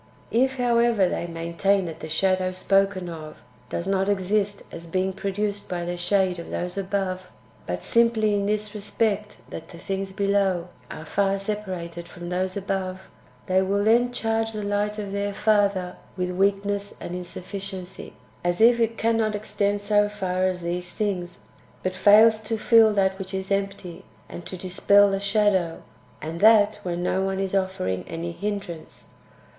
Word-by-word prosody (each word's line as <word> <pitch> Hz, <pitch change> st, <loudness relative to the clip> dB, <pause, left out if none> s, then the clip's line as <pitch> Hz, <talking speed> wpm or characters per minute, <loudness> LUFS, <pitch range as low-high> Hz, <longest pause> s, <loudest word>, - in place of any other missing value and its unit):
2. 230 Hz, -, +2 dB
If, 265 Hz, +1 st, +2 dB
however, 235 Hz, -5 st, +3 dB
they 175 Hz, -, -2 dB
maintain 170 Hz, +4 st, 0 dB
that 165 Hz, -1 st, -7 dB
the 155 Hz, -, -7 dB
shadow 185 Hz, +3 st, +1 dB
spoken 195 Hz, 0 st, +1 dB
of 155 Hz, -2 st, -8 dB, 0.3 s
does 170 Hz, -, -3 dB
not 195 Hz, 0 st, +1 dB
exist 200 Hz, +1 st, 0 dB
as 170 Hz, 0 st, -8 dB
being 185 Hz, +3 st, 0 dB
produced 200 Hz, +1 st, -3 dB
by 175 Hz, -1 st, -3 dB
the 175 Hz, 0 st, -3 dB
shade 180 Hz, 0 st, +1 dB
of 170 Hz, -, -8 dB
[those 180 Hz, 0 st, -3 dB
above], 190 Hz, -2 st, -2 dB, 0.4 s
but 90 Hz, 0 st, -3 dB
simply 230 Hz, -2 st, +3 dB
in 200 Hz, 0 st, 0 dB
this 210 Hz, 0 st, -1 dB
respect, 210 Hz, 0 st, -1 dB
that -, -, -8 dB
[the 170 Hz, -, -11 dB
things 195 Hz, +2 st, -4 dB
below] 195 Hz, -3 st, +1 dB, 0.2 s
are 155 Hz, -, -8 dB
far 195 Hz, +3 st, +1 dB
separated 185 Hz, -5 st, -5 dB
from 175 Hz, 0 st, -8 dB
those 185 Hz, +2 st, -1 dB
[above], 190 Hz, -1 st, -3 dB, 0.4 s
they 185 Hz, 0 st, +3 dB
will 200 Hz, +2 st, +1 dB
then 240 Hz, +3 st, +4 dB
charge 225 Hz, -1 st, -1 dB
the 210 Hz, -1 st, -4 dB
light 205 Hz, +1 st, -1 dB
of 205 Hz, -2 st, -5 dB
their 200 Hz, 0 st, -2 dB
Father 200 Hz, -4 st, +1 dB, 0.2 s
with 180 Hz, 0 st, -1 dB
weakness 200 Hz, +2 st, 0 dB
and 175 Hz, -, -6 dB
insufficiency, 185 Hz, +1 st, -7 dB, 0.3 s
as 175 Hz, 0 st, 0 dB
if 235 Hz, +2 st, +6 dB
it 230 Hz, 0 st, +1 dB
cannot 225 Hz, -2 st, +1 dB
extend 205 Hz, -1 st, -1 dB
so 205 Hz, 0 st, +3 dB
far 185 Hz, -2 st, -1 dB
as 180 Hz, -2 st, -3 dB
these 175 Hz, +1 st, -3 dB
things, 180 Hz, -4 st, -3 dB, 0.4 s
but 185 Hz, -, -1 dB
fails 215 Hz, +4 st, +6 dB
to 220 Hz, +1 st, -3 dB
fill 225 Hz, 0 st, +6 dB
that 190 Hz, -1 st, +1 dB
which 190 Hz, 0 st, -5 dB
is 190 Hz, +1 st, -4 dB
empty, 195 Hz, -2 st, -3 dB, 0.2 s
and 175 Hz, -, -9 dB
to 185 Hz, -, -6 dB
dispel 200 Hz, +2 st, +4 dB
the 195 Hz, -, 0 dB
shadow, 200 Hz, -4 st, +1 dB, 0.4 s
and 160 Hz, +2 st, -5 dB
that 215 Hz, 0 st, +5 dB
when 175 Hz, -2 st, -3 dB
no 185 Hz, +1 st, +1 dB
one 195 Hz, 0 st, -1 dB
is 195 Hz, -1 st, -2 dB
offering 185 Hz, -, -1 dB
any 170 Hz, +1 st, -4 dB
hindrance. 195 Hz, -3 st, -6 dB
195 Hz, 165 wpm, -25 LUFS, 180-205 Hz, 0.4 s, if